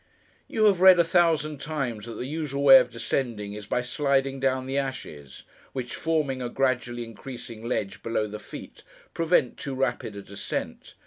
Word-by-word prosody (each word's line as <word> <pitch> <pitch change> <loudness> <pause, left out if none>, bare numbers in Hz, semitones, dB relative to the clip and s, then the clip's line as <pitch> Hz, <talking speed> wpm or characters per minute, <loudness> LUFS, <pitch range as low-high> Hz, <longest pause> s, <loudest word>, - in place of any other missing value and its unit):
You 220 - +1
have 195 -4 +4
read, 185 -1 +9
a 170 - +6
thousand 160 -4 +2
times, 135 -9 -3
that 115 - -6
the - - -4
usual 145 -1 -3
way 135 -1 +10
of - - 0
descending, 115 -3 -2
is, 105 -1 -8
by 125 - 0
sliding 135 +1 0
down 130 -1 0
the 135 +1 0
ashes: 75 - -6 0.3
which, 125 -2 -4
forming 150 -5 -1
a 120 - -3
gradually 120 -2 0
increasing 115 -1 -9
ledge 105 -4 -3
below 115 -1 -1
the 105 0 -7
feet, - - -10 0.3
prevent 165 -6 +2
too 135 -1 -5
rapid 125 -5 -1
a 100 - -7
descent. 100 +1 -5
130 Hz, 175 wpm, -26 LUFS, 115-145 Hz, 0.3 s, way